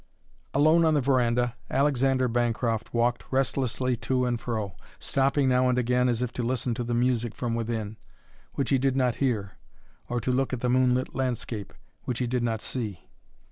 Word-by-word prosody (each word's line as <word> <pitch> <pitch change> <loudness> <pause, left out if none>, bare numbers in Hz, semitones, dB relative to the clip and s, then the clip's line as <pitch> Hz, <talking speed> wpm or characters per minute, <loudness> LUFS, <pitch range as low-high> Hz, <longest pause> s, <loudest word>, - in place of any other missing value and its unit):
Alone 155 +4 +5
on 160 -1 +3
the 145 - +3
veranda, 125 -2 +1
Alexander 135 -2 +2
Bancroft 115 -1 -1
walked 120 +1 +1
restlessly 130 -1 0
to 125 +2 0
and 120 -2 -1
fro, 110 -6 -3 0.2
stopping 135 0 +1
now 125 0 +3
and 125 - +1
again 125 0 +2
as 120 0 0
if 125 - -4
to - - -3
listen 125 0 -1
to 120 +1 -3
the 120 0 -2
music 120 -2 0
from 120 -2 -2
within, 110 -2 -3 0.6
which 140 -1 -1
he 135 - +4
did 135 0 +1
not 125 -3 +1
hear, 110 -8 -1 0.5
or 120 - 0
to 125 - -1
look 130 +1 0
at 125 - -3
the 125 - 0
moonlit 130 0 +2
landscape, 120 -6 -3 0.3
which 125 - -2
he 125 - 0
did 125 +1 -1
not 115 -2 -1
see. 105 -9 -5
125 Hz, 180 wpm, -27 LUFS, 115-130 Hz, 0.6 s, Alone